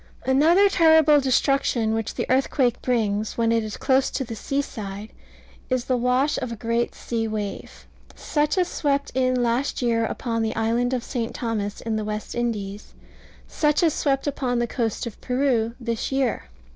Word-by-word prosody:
Another 320 Hz, +9 st, +5 dB
terrible 320 Hz, -5 st, +5 dB
destruction 260 Hz, -4 st, +1 dB
which 225 Hz, -1 st, -3 dB
the -, -, -2 dB
earthquake 260 Hz, -1 st, +1 dB
brings, 215 Hz, -4 st, -1 dB
when 230 Hz, -1 st, +2 dB
it 230 Hz, -1 st, +2 dB
is 215 Hz, -1 st, -6 dB
close 265 Hz, -1 st, +2 dB
to -, -, -2 dB
the 230 Hz, -2 st, -7 dB
seaside, 215 Hz, -5 st, -4 dB, 0.6 s
is 255 Hz, -1 st, 0 dB
the 255 Hz, -, +1 dB
wash 250 Hz, +4 st, +1 dB
of 250 Hz, -, -4 dB
a -, -, -4 dB
great 230 Hz, +2 st, -1 dB
sea 225 Hz, -1 st, -3 dB
wave, 210 Hz, -2 st, -5 dB, 0.3 s
such 300 Hz, +3 st, 0 dB
as 360 Hz, -1 st, +2 dB
swept 280 Hz, -4 st, -1 dB
in 255 Hz, -1 st, +1 dB
last 240 Hz, +4 st, 0 dB
year 230 Hz, -1 st, +2 dB
upon 230 Hz, -2 st, -2 dB
the 220 Hz, 0 st, -1 dB
island 230 Hz, +2 st, +1 dB
of 245 Hz, -, -3 dB
St. 235 Hz, -3 st, -4 dB
Thomas, 215 Hz, -4 st, -3 dB
in 225 Hz, -1 st, -2 dB
the 215 Hz, -, -2 dB
West 210 Hz, 0 st, -4 dB
Indies; 210 Hz, -4 st, -4 dB, 0.5 s
such 300 Hz, +2 st, +1 dB
as 325 Hz, -3 st, +3 dB
swept 270 Hz, -2 st, 0 dB
in 290 Hz, -, +1 dB
upon 250 Hz, -3 st, -2 dB
the 240 Hz, -, +1 dB
coast 230 Hz, -2 st, -2 dB
of 235 Hz, -, -8 dB
Peru 250 Hz, -3 st, 0 dB
this 235 Hz, 0 st, -3 dB
year. 265 Hz, -, 0 dB
240 Hz, 175 wpm, -24 LUFS, 225-270 Hz, 0.6 s, Another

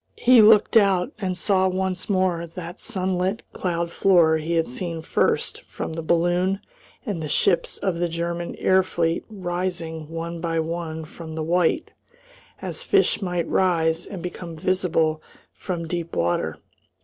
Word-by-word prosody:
He 245 Hz, -2 st, +6 dB
looked 215 Hz, 0 st, +6 dB
out, 195 Hz, -4 st, +3 dB
and 185 Hz, -3 st, -2 dB
saw 190 Hz, 0 st, +2 dB
once 185 Hz, 0 st, -2 dB
more 185 Hz, -3 st, +1 dB
that 170 Hz, +1 st, -8 dB
sunlit 190 Hz, -1 st, -1 dB
cloud 170 Hz, -2 st, -2 dB
floor 170 Hz, -5 st, +4 dB
he 160 Hz, +2 st, -3 dB
had 165 Hz, -1 st, +2 dB
seen 165 Hz, +5 st, -4 dB
first -, -, 0 dB
from -, -, -6 dB
the 165 Hz, -, -4 dB
balloon, 175 Hz, +4 st, +1 dB, 0.5 s
and 200 Hz, -8 st, -3 dB
the 155 Hz, -, -3 dB
ships 175 Hz, +4 st, +2 dB
of 180 Hz, -3 st, -2 dB
the 175 Hz, 0 st, 0 dB
German 170 Hz, +1 st, -3 dB
air 190 Hz, 0 st, +4 dB
fleet 170 Hz, -2 st, -1 dB
rising 175 Hz, -5 st, -4 dB
one 165 Hz, +1 st, -5 dB
by 165 Hz, -1 st, -1 dB
one 160 Hz, -1 st, -3 dB
from 160 Hz, 0 st, -9 dB
the 160 Hz, -, -2 dB
white, 175 Hz, -, +1 dB, 0.7 s
as -, -, -3 dB
fish -, -, +2 dB
might 180 Hz, -3 st, -1 dB
rise 165 Hz, -3 st, +1 dB
and 190 Hz, -4 st, -7 dB
become 175 Hz, -1 st, -6 dB
visible 160 Hz, -2 st, +1 dB, 0.3 s
from 170 Hz, -3 st, -4 dB
deep 170 Hz, 0 st, -4 dB
water. 85 Hz, +1 st, 0 dB
175 Hz, 150 wpm, -24 LUFS, 165-185 Hz, 0.7 s, He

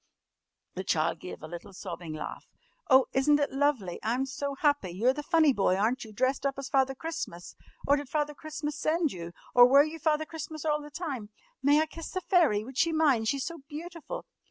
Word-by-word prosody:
The 185 Hz, -, -4 dB
child 165 Hz, -2 st, 0 dB
gave 180 Hz, -, -9 dB
a -, -, -6 dB
little 175 Hz, +4 st, -9 dB
sobbing 175 Hz, -4 st, -7 dB
laugh. 155 Hz, -, -7 dB, 0.4 s
"Oh, 260 Hz, -1 st, +7 dB
isn't 290 Hz, +2 st, +4 dB
it 285 Hz, -, 0 dB
lovely? 270 Hz, -11 st, 0 dB
I'm 240 Hz, +5 st, 0 dB
so 280 Hz, +1 st, -4 dB
happy! 285 Hz, -, +1 dB
You're 220 Hz, +9 st, +2 dB
the 295 Hz, -, -4 dB
funny 315 Hz, -2 st, +4 dB
boy, 195 Hz, -4 st, +2 dB
aren't 225 Hz, +6 st, 0 dB
you, 220 Hz, -, -11 dB
dressed 255 Hz, +5 st, 0 dB
up 275 Hz, -1 st, 0 dB
as 275 Hz, -1 st, -5 dB
Father 270 Hz, -1 st, +2 dB
Christmas? 320 Hz, -, -6 dB, 0.3 s
Or 285 Hz, +1 st, +4 dB
did 285 Hz, -2 st, -6 dB
Father 295 Hz, 0 st, -1 dB
Christmas 300 Hz, 0 st, -5 dB
send 310 Hz, 0 st, +1 dB
you? 170 Hz, -1 st, -7 dB, 0.2 s
Or 245 Hz, 0 st, +9 dB
were 275 Hz, +3 st, +7 dB
you 310 Hz, +2 st, -5 dB
Father 315 Hz, 0 st, +1 dB
Christmas 315 Hz, -1 st, -7 dB
all 300 Hz, -1 st, +1 dB
the 295 Hz, -, -10 dB
time? 280 Hz, -, -5 dB, 0.3 s
May 290 Hz, +2 st, +5 dB
I 315 Hz, -, +3 dB
kiss 330 Hz, +1 st, -8 dB
the 370 Hz, -, -3 dB
fairy? 335 Hz, -, +3 dB
Would 260 Hz, +3 st, -6 dB
she 335 Hz, -, +3 dB
mind? 285 Hz, -8 st, +3 dB
She's 275 Hz, +3 st, 0 dB
so 335 Hz, -1 st, -6 dB
beautiful!" 335 Hz, +2 st, -7 dB
280 Hz, 205 wpm, -29 LUFS, 225-310 Hz, 0.4 s, Or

